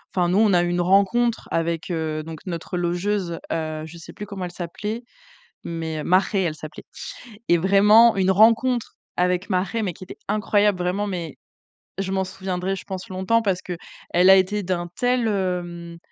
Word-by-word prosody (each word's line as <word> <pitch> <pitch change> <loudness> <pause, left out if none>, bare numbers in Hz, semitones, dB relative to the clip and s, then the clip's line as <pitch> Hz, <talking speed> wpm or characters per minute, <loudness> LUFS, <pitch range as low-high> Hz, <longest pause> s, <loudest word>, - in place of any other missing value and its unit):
enfin, 175 -2 +2
nous, 180 - +2
on 215 -3 +4
a 175 -1 +4
eu 175 - -1
une 175 0 0
rencontre 200 +6 +2
avec 165 +1 -1
heu, 155 -2 -2
donc 160 0 -8
notre 175 0 -4
logeuse, 175 0 -1
heu, 155 -1 -3
je 160 +2 -11
sais 165 - -11
plus 210 - -7
comment 195 -2 -5
elle 175 - -6
s'appelait, 210 +7 -5 0.6
mais 160 -2 -4
Marhé 190 +2 +2
elle 165 -4 -1
s'appelait. 155 0 -10 0.6
Et 175 - +5
vraiment 210 +5 +6
une 190 -1 +2
rencontre 230 +4 +3 0.2
avec 180 +3 0
Marhé 190 +5 0
mais 185 -4 -2
qui 185 - -11
était - - -10
incroyable 210 -2 +2
vraiment 180 +3 -1
mais, 175 -7 -4 0.6
je 195 -1 -2
m'en 190 0 +1
souviendrai, 185 0 -3
je - - -9
pense 190 -2 -6
longtemps 190 +5 +1
parce 190 -4 0
qu'elle 180 +1 0
a 190 - +9
été 200 +2 +1
d'un 175 -2 -2
tel 245 -1 +1
hem, 175 -4 -3
185 Hz, 180 wpm, -23 LUFS, 175-205 Hz, 0.6 s, a